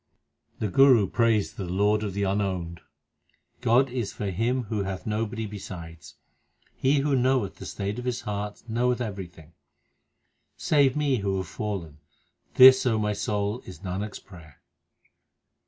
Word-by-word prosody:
The 110 Hz, -, -2 dB
Guru 125 Hz, +1 st, +5 dB
prays 115 Hz, -2 st, +1 dB
to -, -, -28 dB
the 90 Hz, -, -5 dB
Lord 105 Hz, +3 st, +2 dB
of 100 Hz, -3 st, -4 dB
the 100 Hz, -, -1 dB
unowned: 95 Hz, -4 st, -2 dB, 0.8 s
God 125 Hz, +3 st, +3 dB
is 120 Hz, -5 st, -3 dB
for 100 Hz, -2 st, -4 dB
him 120 Hz, +7 st, 0 dB
Who 110 Hz, -1 st, -3 dB
hath 95 Hz, -1 st, -5 dB
nobody 110 Hz, +1 st, -2 dB
besides. 90 Hz, -6 st, -9 dB, 0.6 s
He 140 Hz, +2 st, +2 dB
who 140 Hz, -1 st, +1 dB
knoweth 125 Hz, -5 st, +1 dB
the -, -, -8 dB
state 100 Hz, +3 st, -4 dB
of 125 Hz, -, -7 dB
his 125 Hz, -1 st, -2 dB
heart 105 Hz, 0 st, -5 dB
Knoweth 120 Hz, +2 st, 0 dB
everything. 90 Hz, -8 st, -7 dB, 1.0 s
Save 140 Hz, -3 st, +2 dB
me 145 Hz, -3 st, +1 dB
who 100 Hz, -2 st, -1 dB
have 95 Hz, -1 st, -4 dB
fallen 85 Hz, -4 st, -5 dB, 0.6 s
This, 130 Hz, 0 st, +9 dB
O 115 Hz, -3 st, +2 dB
my 105 Hz, -1 st, 0 dB
soul, 105 Hz, +3 st, -2 dB
is 95 Hz, -, -10 dB
Nanak 100 Hz, +2 st, -4 dB
s -, -, -7 dB
prayer. 80 Hz, -6 st, -16 dB
105 Hz, 155 wpm, -26 LUFS, 95-120 Hz, 1.0 s, This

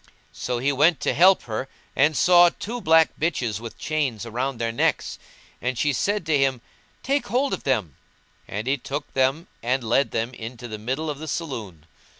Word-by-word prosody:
So 125 Hz, -1 st, -3 dB
he 135 Hz, +4 st, +1 dB
went 150 Hz, +4 st, +3 dB
to -, -, +1 dB
help 185 Hz, +4 st, +5 dB
her 115 Hz, +3 st, -4 dB, 0.3 s
and 150 Hz, +2 st, +3 dB
saw 175 Hz, +3 st, +7 dB
two 235 Hz, +7 st, -6 dB
black 160 Hz, -3 st, +5 dB
bitches 125 Hz, -10 st, -1 dB
with 115 Hz, 0 st, -9 dB
chains 140 Hz, -8 st, -2 dB
round 125 Hz, +3 st, -2 dB
their 115 Hz, 0 st, -1 dB
necks; 115 Hz, -, 0 dB, 0.4 s
and 125 Hz, 0 st, -2 dB
she 145 Hz, +2 st, +1 dB
said 205 Hz, +4 st, 0 dB
to 155 Hz, -1 st, +2 dB
him, 135 Hz, -2 st, +2 dB, 0.4 s
"Take 280 Hz, +2 st, 0 dB
hold 260 Hz, +6 st, +1 dB
of -, -, -4 dB
them;" 105 Hz, -, 0 dB, 0.5 s
and 105 Hz, +3 st, -4 dB
he 135 Hz, +2 st, +1 dB
took 140 Hz, +3 st, -6 dB
them 135 Hz, +5 st, +1 dB, 0.2 s
and 125 Hz, +2 st, 0 dB
led 115 Hz, +3 st, +2 dB
them 115 Hz, +3 st, -2 dB
into 120 Hz, +1 st, -8 dB
the 110 Hz, -2 st, -7 dB
middle 130 Hz, +8 st, -3 dB
of 145 Hz, -2 st, -4 dB
the 160 Hz, -, -7 dB
saloon. 110 Hz, -, -5 dB
135 Hz, 185 wpm, -24 LUFS, 115-160 Hz, 0.5 s, saw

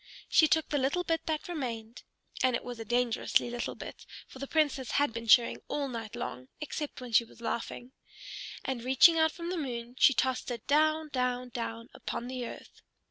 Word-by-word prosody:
She 315 Hz, -, +6 dB
took 320 Hz, 0 st, +2 dB
the 290 Hz, -, +1 dB
little 280 Hz, +7 st, +1 dB
bit 325 Hz, -1 st, -1 dB
that 310 Hz, -1 st, -1 dB
remained, 240 Hz, -8 st, -5 dB, 0.4 s
and 255 Hz, -2 st, +3 dB
it -, -, -3 dB
was 245 Hz, -2 st, -7 dB
a -, -, -4 dB
dangerously 240 Hz, 0 st, +1 dB
little 240 Hz, 0 st, -3 dB
bit, -, -, -9 dB, 0.2 s
for 265 Hz, -, -12 dB
the 275 Hz, -, -4 dB
Princess 290 Hz, -5 st, +1 dB
had 285 Hz, -4 st, +2 dB
been 230 Hz, 0 st, -5 dB
chewing 235 Hz, +2 st, +5 dB
all 285 Hz, -1 st, -1 dB
night 230 Hz, -4 st, -6 dB
long, 125 Hz, +1 st, -5 dB
except 300 Hz, -2 st, -5 dB
when 250 Hz, -1 st, -7 dB
she 230 Hz, -, +6 dB
was 230 Hz, -, -17 dB
laughing, 235 Hz, +2 st, -4 dB, 0.7 s
and 255 Hz, -3 st, -2 dB
reaching 265 Hz, +6 st, +6 dB
out 320 Hz, 0 st, +4 dB
from 340 Hz, +1 st, -5 dB
the 365 Hz, -, -2 dB
moon 245 Hz, -5 st, -4 dB
she 275 Hz, -, +7 dB
tossed 260 Hz, -1 st, 0 dB
it 235 Hz, -3 st, -5 dB
down, 310 Hz, +2 st, +3 dB
down, 250 Hz, -2 st, -1 dB
down 230 Hz, -1 st, -5 dB
upon 235 Hz, -, -5 dB
the 250 Hz, -1 st, -4 dB
earth. -, -, -11 dB
255 Hz, 195 wpm, -30 LUFS, 235-300 Hz, 0.7 s, she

